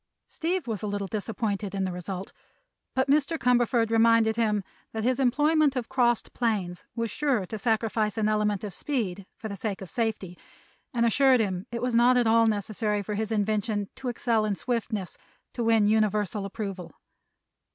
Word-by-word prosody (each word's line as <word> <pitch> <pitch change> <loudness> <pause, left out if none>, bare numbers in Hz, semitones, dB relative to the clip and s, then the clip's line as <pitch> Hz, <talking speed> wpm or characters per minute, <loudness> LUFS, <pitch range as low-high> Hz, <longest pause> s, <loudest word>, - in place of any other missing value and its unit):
Steve 355 +3 -2
was 220 -5 -3
a 210 - -3
little 205 0 -2
disappointed 205 -1 -3
in 195 - 0
the 185 - -1
result, 180 +2 -6 0.6
but 260 +1 +2
Mr. 295 +3 +2
Cumberford 240 -3 +2
reminded 225 -1 +4
him 210 -3 +1 0.3
that 220 -1 -3
his 255 +3 +1
employment 295 +3 +3
of 250 -3 -3
crossed 240 -3 +1
planes 200 -7 -1
was 230 -2 -2
sure 270 -9 0
to 220 +4 -6
sacrifice 220 -1 0
an 215 -1 +1
element 210 -2 +1
of 205 -3 -5
speed 200 - -3
for 220 - -6
the 200 - -5
sake 200 0 -3
of 190 - -9
safety, 215 -6 -2 0.5
and 235 -2 +1
assured 260 +2 +4
him 190 -1 -1
it 235 0 -4
was 250 -1 0
not 240 +2 +5
at 245 - +3
all 225 0 +5
necessary 210 0 -1
for 210 - -4
his 215 +1 -2
invention 210 -1 0
to 265 -1 -5
excel 230 -2 +1
in 210 -2 0
swiftness 220 -5 -3 0.3
to 240 - -2
win 225 -2 +4
universal 210 -1 +1
approval. 195 -3 -6
220 Hz, 175 wpm, -27 LUFS, 205-240 Hz, 0.6 s, not